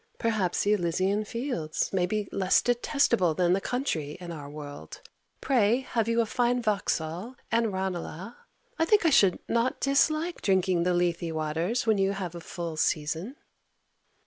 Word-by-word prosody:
Perhaps 215 -6 0
the 205 - +3
Elysian 190 +2 0
fields 230 - -3
may 180 -2 +2
be 210 +1 -2
less 190 -1 +2
detestable 240 - +2
than 175 +1 +3
the 195 - +1
country 165 - -2
in 175 -1 -7
our 145 -3 -7
world. 145 -1 -9 0.4
Pray 240 -2 +3
have 230 -4 -1
you 230 0 +2
a - - 0
fine 245 +2 +1
Vauxhall 200 -1 -2 0.2
and 230 -1 +2
Ranelagh? 190 +1 -4 0.5
I 325 - +3
think 410 +1 +3
I 325 - +5
should 195 -9 +5
not 235 +2 0
dislike 310 +5 +1
drinking 185 -2 +2
the 180 +1 +1
Lethe 175 -1 0
waters 160 +9 -1
when 220 -3 +2
you 195 0 +2
have 185 -4 -5
a 170 - -8
full 170 -1 -6
season. 160 - -1
195 Hz, 160 wpm, -27 LUFS, 170-235 Hz, 0.5 s, I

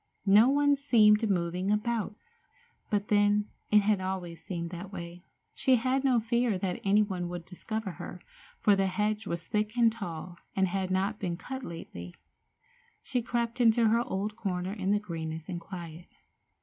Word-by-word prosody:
No 210 +5 +7
one 285 +1 +4
seemed 220 -6 +4
moving 180 0 0
about. 210 0 0 0.7
But, 205 0 -1
then, 205 0 +3 0.2
it 210 0 +6
had 205 -2 +2
always 180 -3 -4
seemed 170 -2 -4
that 180 +2 -7
way. 175 -1 -8 0.3
She 260 - +3
had 255 +3 +1
no 255 -3 +4
fear 235 -2 +1
that 180 -1 -3
any 205 +2 +4
one 180 -4 -3
would 175 -1 -6
discover 215 +3 -4
her, 180 - -8 0.4
for 205 - +5
the 195 0 +2
hedge 210 +2 -1
was 170 -1 -3
thick 215 +3 -1
and 230 -1 +5
tall, 175 -5 -7 0.2
and 190 -1 +3
had 190 0 -2
not 195 +3 0
been 175 -4 -2
cut 265 +8 -6
lately. 90 - -8 0.9
She 250 -3 -1
crept 235 +1 -2
into 230 -1 +5
her 230 +2 +3
old 210 -1 -3
corner 185 -3 -3
in 195 -2 -2
the 205 - +4
greenness 160 -5 -5
and 175 -3 -4
quiet. 170 -2 -8
200 Hz, 170 wpm, -29 LUFS, 180-225 Hz, 0.9 s, No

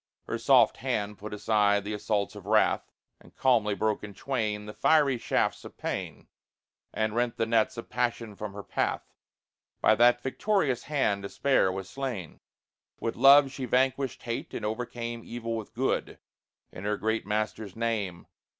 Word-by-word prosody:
Her - - -4
soft - - +5
hand 105 0 -2
put 105 +1 -7
aside 105 -1 +2
the 105 +1 -4
assaults 105 -1 -1
of 100 -1 -10
wrath, 110 0 +2 0.3
And - - -20
calmly 115 -6 +2
broke 110 0 -1
in 105 -1 -8
twain 105 -4 -2
The 105 - -8
fiery 145 -4 +3
shafts - - 0
of - - -11
pain, - - -5 0.6
And 110 -1 -1
rent 120 0 0
the 115 - +1
nets 115 0 +1
of 115 - -6
passion 115 -3 -2
from 105 0 -6
her 100 0 -7
path. - - -2 0.7
By - - +5
that 120 +2 +4
victorious 140 - 0
hand 135 -9 0
despair 100 +1 +2
was 95 0 -5
slain. 120 - -5 0.6
With 115 - -2
love 135 +2 +7
she 135 -1 -5
vanquished 130 +1 0
hate 115 -1 -4
and 110 - -4
overcame 115 +1 -4
Evil 115 -1 -4
with 110 -2 -6
good, 130 +3 -1 0.5
in 90 - -9
her 105 +1 0
Great 110 0 -1
Master's 105 -1 -2
name. 110 -6 -2
110 Hz, 160 wpm, -28 LUFS, 105-125 Hz, 0.7 s, love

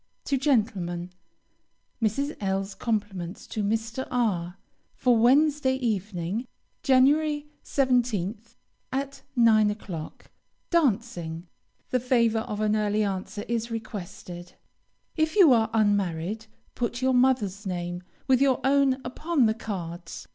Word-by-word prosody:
To 280 - +1
gentlemen: 205 - 0 0.9
Mrs. 275 +8 0
L 195 0 0
's 195 - -9
compliments 195 -4 -3
to 215 - -4
Mr. 225 +4 -2
R 195 -8 0 0.4
for 250 -2 +3
Wednesday 270 +3 +4
evening, 210 -3 -2 0.3
Jan. 260 -3 +5 0.6
17th, 235 -5 0 0.4
at 275 +1 -3
9 220 -3 +5
o'clock. 185 -7 -7 0.4
Dancing. 215 - 0 0.5
The 255 - +2
favor 235 -3 +2
of 215 -1 -4
an 215 0 +2
early 210 0 +1
answer 200 +1 -3
is 235 0 -1
requested. 180 -5 -7 0.6
If 315 +2 +1
you 355 -10 +7
are 225 -2 +3
unmarried, 205 -1 0 0.3
put 240 +1 -3
your 260 0 +3
mother's 235 -6 +2
name 175 -1 -3 0.3
with 260 -1 +4
your 270 -3 +4
own 275 -1 +3
upon 310 -1 +1
the 220 - +3
cards. 175 -6 -6
220 Hz, 120 wpm, -26 LUFS, 195-255 Hz, 0.9 s, you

